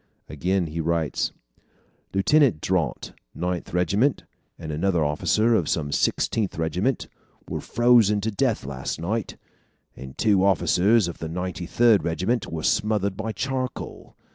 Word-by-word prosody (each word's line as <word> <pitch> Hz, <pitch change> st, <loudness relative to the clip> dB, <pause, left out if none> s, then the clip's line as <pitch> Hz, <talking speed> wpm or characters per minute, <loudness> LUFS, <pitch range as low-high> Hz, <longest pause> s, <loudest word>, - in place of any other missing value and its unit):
Again 90 Hz, +5 st, -1 dB
he 80 Hz, +1 st, -4 dB
writes: 80 Hz, -1 st, -1 dB, 0.8 s
"Lieutenant 125 Hz, -, +3 dB
Daunt, 85 Hz, -7 st, -2 dB, 0.2 s
Ninth 90 Hz, 0 st, -3 dB
Regiment, 100 Hz, -, +1 dB, 0.3 s
and 80 Hz, -2 st, -7 dB
another 85 Hz, +1 st, +1 dB
officer 110 Hz, +10 st, +2 dB
of 90 Hz, -9 st, +1 dB
some 75 Hz, -3 st, -1 dB
Sixtieth 105 Hz, +6 st, 0 dB
Regiment, 90 Hz, -, -1 dB, 0.4 s
were -, -, -4 dB
frozen 120 Hz, -4 st, +4 dB
to 110 Hz, +2 st, -1 dB
death 110 Hz, -, 0 dB
last 70 Hz, +1 st, -4 dB
night, 100 Hz, +5 st, -3 dB, 0.6 s
and 65 Hz, 0 st, -10 dB
two 100 Hz, -4 st, +3 dB
officers 100 Hz, +2 st, +3 dB
of 85 Hz, -, -7 dB
the 80 Hz, -, -5 dB
Ninety 90 Hz, 0 st, -4 dB
Third 115 Hz, -1 st, +4 dB
Regiment 95 Hz, +8 st, -1 dB
were 80 Hz, -1 st, -4 dB
smothered 105 Hz, -2 st, +1 dB
by 110 Hz, -, -4 dB
charcoal. 130 Hz, +4 st, -5 dB
95 Hz, 135 wpm, -24 LUFS, 80-110 Hz, 0.8 s, frozen